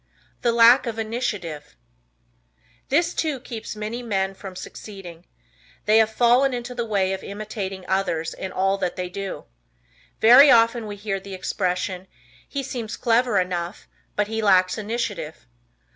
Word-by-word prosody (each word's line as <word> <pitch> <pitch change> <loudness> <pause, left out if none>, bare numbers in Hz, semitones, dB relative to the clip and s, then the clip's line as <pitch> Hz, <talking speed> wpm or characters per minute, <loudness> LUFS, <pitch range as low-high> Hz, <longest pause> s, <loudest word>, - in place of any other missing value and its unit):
The 235 - +2
Lack 235 +3 +6
of 225 -1 -3
Initiative. 205 -10 -4 1.1
This, 335 +5 +2
too, 305 -5 -1
keeps 230 -4 -7
many 215 +3 -4
men 195 -4 -1
from 190 -1 -10
succeeding. 180 -3 -10 0.6
They 215 +1 +5
have 220 -1 +4
fallen 245 +3 +3
into 240 +1 -5
the 235 -1 -3
way 195 -3 +1
of 190 - -5
imitating 200 -2 -6
others 180 -4 -1
in 190 - -6
all 195 +1 0
that 180 -2 -2
they 180 -1 -4
do. 195 +1 -6 0.7
Very 250 +6 +8
often 230 -1 +4
we 205 - -6
hear 200 -1 -3
the 195 0 -8
expression, 185 0 -2 0.4
"He 280 -1 -3
seems 235 -4 -5
clever 240 -2 +2
enough, 180 0 -3 0.3
but 210 - +1
he 220 +1 -3
lacks 185 -3 +4
initiative." 210 -8 -4
210 Hz, 145 wpm, -23 LUFS, 190-235 Hz, 1.1 s, Very